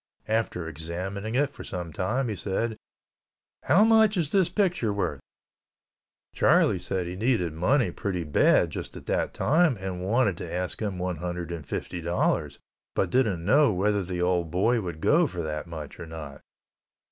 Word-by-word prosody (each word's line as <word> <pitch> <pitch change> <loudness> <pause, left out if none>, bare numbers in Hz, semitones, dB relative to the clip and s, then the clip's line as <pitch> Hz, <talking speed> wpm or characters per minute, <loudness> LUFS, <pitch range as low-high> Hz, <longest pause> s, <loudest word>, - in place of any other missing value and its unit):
After 110 -6 -1
examining 90 +8 -4
it 140 +1 +2
for - - -10
some 90 -3 -6
time, 120 - -1
he 110 - -2
said, 110 +4 -2 0.9
"How 175 +10 +4
much 220 -2 +5
is 155 -4 0
this 190 -4 +3
picture 180 - +1
worth?" 90 -8 -2 1.1
Charlie - - +4
said 95 -2 -2
he 90 +1 -5
needed 95 -6 0
money 95 - +2
pretty 90 -1 -3
bad 75 -2 +3
just - - -6
at - - -11
that - - 0
time 155 -2 +2
and 95 -1 -4
wanted 105 -2 +2
to 85 - -6
ask 90 +3 -2
him 100 -4 -2
one 90 -1 -2
hundred 85 0 -4
and 80 -5 -6
fifty 90 - -4
dollars, 85 +1 0 0.4
but 90 - 0
didn't 105 -10 +1
know 140 +5 +5
whether 100 +1 +1
the 90 -1 -3
old 90 -2 +1
boy 110 +8 +2
would 85 -5 -6
go 165 +2 +4
for 90 -8 -5
that 75 0 -4
much 80 -3 -8
or 85 - -7
not. 75 -4 -8
95 Hz, 170 wpm, -27 LUFS, 85-120 Hz, 1.1 s, much